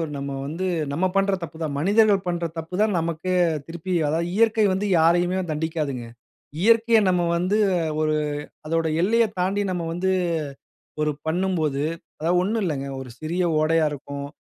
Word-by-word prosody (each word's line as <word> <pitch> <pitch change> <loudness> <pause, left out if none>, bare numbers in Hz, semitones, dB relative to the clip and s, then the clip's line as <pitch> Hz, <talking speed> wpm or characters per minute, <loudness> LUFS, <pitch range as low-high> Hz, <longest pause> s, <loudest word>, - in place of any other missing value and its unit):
நம்ம 140 0 -4
வந்து 165 +6 -3 0.3
நம்ம 170 +6 +1
பண்ற 195 0 +2
தப்பு 160 -1 -8
தான். 150 -3 -2
மனிதர்கள் 200 +3 +3
பண்ற 175 -1 -1
தப்பு 165 +2 -5
தான். 215 -3 +2
நமக்கு 170 +2 -2 0.4
திருப்பி 170 +2 -5
அதாவது, 165 +3 0
இயற்கை 225 0 +3
வந்து 190 +2 -1
யாரையுமே 175 +3 +3
தண்டிக்காதுங்க. 150 -5 -2 0.6
இயற்கையை 230 +2 +5
நம்ம 180 -1 +2
வந்து 185 +4 +1 0.4
ஒரு 155 0 +1 0.5
அதோட 165 +1 0 0.2
எல்லைய 230 +5 +4 0.2
தாண்டி, 195 +3 +1
நம்ம 175 -2 -2
வந்து 180 +3 0 0.9
ஒரு 150 0 +1
பண்ணும்போது, 160 -4 0 0.4
அதாவது 170 +3 +2
ஒண்ணும் 215 +4 0
இல்லங்க. 145 -6 -2
ஒரு 130 -2 -8
சிறிய 170 +4 -1 0.2
ஓடையா 160 0 +3
இருக்கும், 140 0 -6
170 Hz, 145 wpm, -24 LUFS, 155-190 Hz, 0.9 s, இயற்கையை